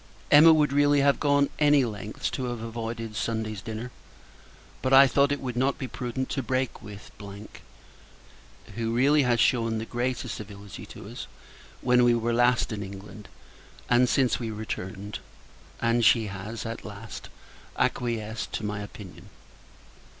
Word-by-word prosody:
Emma 155 +3 +9
would 150 -3 +3
really 145 0 +4
have 140 0 +3
gone 140 -1 +3
any 145 -3 +5
lengths, 105 -2 -4
to 130 - -3
have 120 -2 -4
avoided 115 -1 -5
Sunday's 110 -3 -2
dinner. 110 +3 -6 0.9
But 130 0 0
I 135 +1 +10
thought 140 +2 +3
it 145 - 0
would 125 -2 -4
not 130 +3 +1
be 130 - -4
prudent 125 +1 -4
to 135 - -1
break 130 0 -2
with; 105 -1 -11 1.6
who, 115 +2 -2
really, 145 +4 +4
has 120 -3 +2
shewn 115 -2 +2
the 110 - -4
greatest 125 +2 -2
civility 100 -2 -9
to - - -11
us, - - -8 0.5
when 125 -1 +4
we 120 -1 +5
were 120 0 0
last 120 0 +3
in 105 -2 -4
England, 100 +2 -9 0.6
and 125 0 +5
since 130 -3 +2
we 115 -2 -3
returned: 105 -2 -5 0.6
and 115 0 +2
she 115 0 +5
has, 105 +4 -6
at 115 0 -5
last, 105 +1 -9 0.5
acquiesced 110 -3 -1
to 105 - -3
my 105 0 -3
opinion. 105 -2 -11
115 Hz, 150 wpm, -27 LUFS, 110-130 Hz, 1.6 s, I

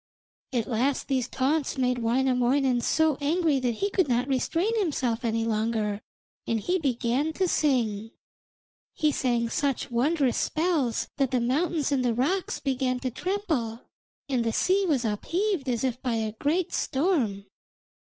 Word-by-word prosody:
At 240 -4 0
last 245 +6 0
these 260 -3 0
taunts 275 +3 0
made 250 -1 +1
Wainamoinen 250 +1 +2
so 315 +3 +2
angry 310 -1 +2
that 245 -3 -1
he 400 - -1
could 375 -5 +2
not 245 0 +1
restrain 330 - 0
himself 260 - -1
any 225 -1 0
longer, 215 -2 -1 0.5
and 230 -1 +1
he 360 - 0
began 265 +2 0
to 375 +3 0
sing. 230 -10 +1 0.9
He 305 -1 +2
sang 240 -4 0
such 275 -1 -1
wondrous 265 +2 +1
spells 310 -8 0
that 275 -3 +2
the 255 - +1
mountains 295 +5 0
and 270 -2 +1
the 240 -2 +1
rocks 345 +10 0
began 260 -2 -1
to 255 - -2
tremble, 305 - -2 0.5
and 255 -4 0
the 230 - 0
sea 385 +1 +2
was 270 -7 +1
upheaved 335 - -1
as 240 -1 -1
if 255 -1 -1
by 245 -3 -1
a 220 -1 -1
great 335 +5 0
storm. 265 - 0
260 Hz, 150 wpm, -27 LUFS, 235-310 Hz, 0.9 s, Wainamoinen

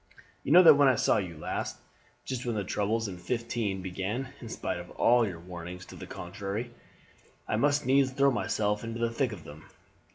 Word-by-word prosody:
You - - -2
know 180 +3 +9
that 165 - +10
when 140 -1 +5
I 130 - +5
saw - - +3
you 90 -6 -4
last 75 - -4 0.5
just 130 -2 -3
when 120 -2 -2
the 105 - -1
troubles 105 +4 -1
in 90 -3 -7
'15 110 -1 -2
began 100 +8 -3
in 115 - -8
spite 90 - -3
of 85 - -9
all 120 -1 +3
your 90 -4 -6
warnings 90 +1 -8
to - - -12
the - - -9
contrary, 100 +6 -5 0.8
I - - 0
must 145 +4 +2
needs 135 +1 +4
throw 140 +1 +3
myself 105 -1 0
into 115 0 -5
the 115 0 0
thick 130 -1 0
of 95 -7 -8
them. 75 +2 -12
110 Hz, 200 wpm, -29 LUFS, 95-125 Hz, 0.8 s, that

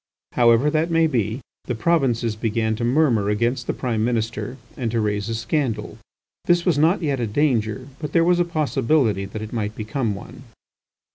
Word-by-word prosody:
However 120 +4 +4
that 155 +2 +1
may 165 -1 +3
be, 120 -4 -1 0.2
the 125 - -2
provinces 120 -5 +1
began 110 0 -1
to 120 - -3
murmur 120 -5 +2
against 120 +4 0
the - - 0
Prime 115 -4 -1
Minister, 115 +2 -2 0.2
and 120 -3 -2
to 115 +1 0
raise 105 0 -1
a 115 - -1
scandal. 115 +2 -2 0.5
This 175 0 +3
was 170 -6 +2
not 165 +5 +3
yet 140 -4 0
a 120 - -1
danger, 120 -1 0
but 150 -2 -5
there 165 0 +4
was 175 +1 +3
a - - +4
possibility 135 - +1
that 105 +2 -6
it 110 - -8
might 110 -2 -2
become 110 0 -2
one. 100 - -11
120 Hz, 185 wpm, -22 LUFS, 110-150 Hz, 0.5 s, However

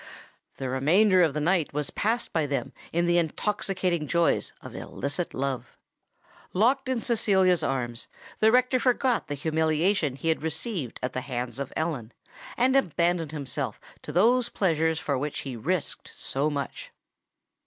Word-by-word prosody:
The 135 - -4
remainder 180 +10 +4
of 160 -5 +3
the - - 0
night 165 0 +1
was 150 0 -2
passed 230 +4 -1
by 160 -3 +1
them 140 -1 -2 0.2
in 170 +1 +1
the 175 0 +4
intoxicating 180 -1 -1
joys 170 +1 +2
of - - -10
illicit 145 +5 -4
love. 135 -1 -3 0.8
Locked 255 +7 +2
in 255 -2 +1
Cecilia's 190 -7 +3
arms, 120 -5 -2 0.3
the 220 0 +5
rector 255 +1 +3
forgot 250 -1 +2
the 145 - -3
humiliation 160 +1 +1
he 165 +4 -2
had 160 - +1
received 160 - -3
at 125 - -2
the 130 - -2
hands 125 0 -4
of 140 - -4
Ellen, 150 -8 -2 0.4
and 260 +1 +3
abandoned 170 - +1
himself 145 -4 -3 0.2
to - - -7
those 240 +6 +4
pleasures 160 -4 +1
for 140 -4 -1
which 145 +2 -3
he 135 -3 -5
risked 160 +9 -2
so 140 +3 -1
much! 140 -2 -4
160 Hz, 155 wpm, -27 LUFS, 140-195 Hz, 0.8 s, the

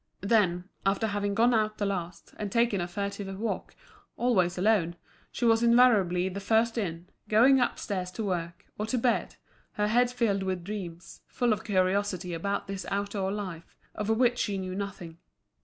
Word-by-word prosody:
Then, 195 -4 +2 0.2
after 195 +3 +1
having 205 -1 -1
gone 235 +3 +4
out 215 -1 +1
the 205 - -1
last 180 -3 -4
and 205 -2 -4
taken 230 -4 +2
a 175 - -2
furtive 200 +1 -4
walk, 230 - -3 0.4
always 185 -8 +2
alone, 180 -3 +2 0.4
she 240 - -2
was 225 -1 +4
invariably 220 -7 +4
the 190 +1 -4
first 225 +3 +2
in, 175 -6 -3 0.2
going 255 +5 +6
upstairs 195 -6 -1
to 225 - -4
work, 175 -4 -3
or 210 - -2
to 250 - 0
bed, 240 0 0 0.4
her 210 0 0
head 245 +2 +3
filled 230 -6 0
with 185 -2 -2
dreams, 175 -4 -7
full 240 -3 +1
of 205 - -5
curiosity 185 -2 0
about 200 +5 -2
this 195 -1 -6
outdoor 200 -1 -2
life, 185 -5 -6 0.2
of 210 0 -4
which 240 +2 +3
she 200 -2 -1
knew 185 -1 -4
nothing. 190 -4 -6
200 Hz, 170 wpm, -28 LUFS, 185-225 Hz, 0.4 s, going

